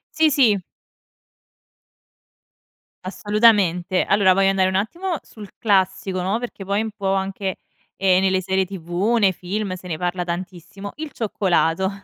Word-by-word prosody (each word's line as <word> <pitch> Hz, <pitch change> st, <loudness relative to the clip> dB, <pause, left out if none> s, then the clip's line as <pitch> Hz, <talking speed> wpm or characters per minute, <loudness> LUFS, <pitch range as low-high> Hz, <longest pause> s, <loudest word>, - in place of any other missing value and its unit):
Sì, 315 Hz, 0 st, +4 dB
sì. 245 Hz, -8 st, +3 dB, 2.4 s
Assolutamente. 195 Hz, -3 st, +2 dB
Allora 200 Hz, -2 st, +4 dB
voglio 195 Hz, +1 st, +3 dB
andare 190 Hz, -1 st, +2 dB
un 190 Hz, -, -1 dB
attimo 335 Hz, -, -2 dB
sul 210 Hz, -3 st, -12 dB
classico, 190 Hz, -2 st, +1 dB
no, 190 Hz, +4 st, 0 dB
perché 235 Hz, -5 st, -7 dB
poi 200 Hz, +2 st, 0 dB
un 220 Hz, 0 st, -4 dB
po' 195 Hz, -2 st, -2 dB
anche, 195 Hz, 0 st, -2 dB, 0.4 s
ehm, 185 Hz, -1 st, +3 dB
nelle 190 Hz, -1 st, +2 dB
serie 190 Hz, +1 st, 0 dB
TV, 185 Hz, +4 st, -2 dB
nei 195 Hz, -2 st, +4 dB
film, 185 Hz, +2 st, -4 dB
se 185 Hz, 0 st, -11 dB
ne 165 Hz, -3 st, -3 dB
parla 180 Hz, +1 st, -2 dB
tantissimo: 180 Hz, +3 st, -6 dB
il 310 Hz, -1 st, -6 dB
cioccolato. 190 Hz, -4 st, 0 dB
195 Hz, 140 wpm, -21 LUFS, 185-210 Hz, 2.4 s, Sì